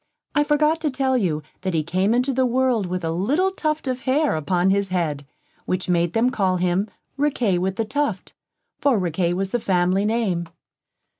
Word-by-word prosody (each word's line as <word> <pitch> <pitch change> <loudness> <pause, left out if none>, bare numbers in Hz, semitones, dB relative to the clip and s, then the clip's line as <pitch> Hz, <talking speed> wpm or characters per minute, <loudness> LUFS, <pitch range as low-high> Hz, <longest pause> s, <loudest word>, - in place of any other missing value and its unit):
I 295 - +3
forgot 300 +2 +2
to 310 - +1
tell 260 -1 0
you, 165 -10 0 0.2
that 185 -2 -2
he 155 - +1
came 185 +7 +1
into 250 +2 +1
the 260 0 +2
world 250 -5 +1
with 180 0 -3
a 160 - -1
little 280 - +1
tuft 310 -5 -2
of 255 -1 -1
hair 280 - +1
upon 175 +4 +1
his 200 0 +1
head, 155 -6 -2 0.4
which 185 0 -2
made 170 -1 +1
them 240 +3 +2
call 190 -6 +1
him 180 +3 0 0.3
Riquet 245 -10 +1
with 190 +1 -1
the 225 - -1
Tuft, 265 -5 -2 0.5
for 275 -5 +3
Riquet 175 -1 0
was 195 +1 -2
the 240 - 0
family 185 0 +1
name. 210 -6 0
200 Hz, 190 wpm, -22 LUFS, 180-260 Hz, 0.5 s, I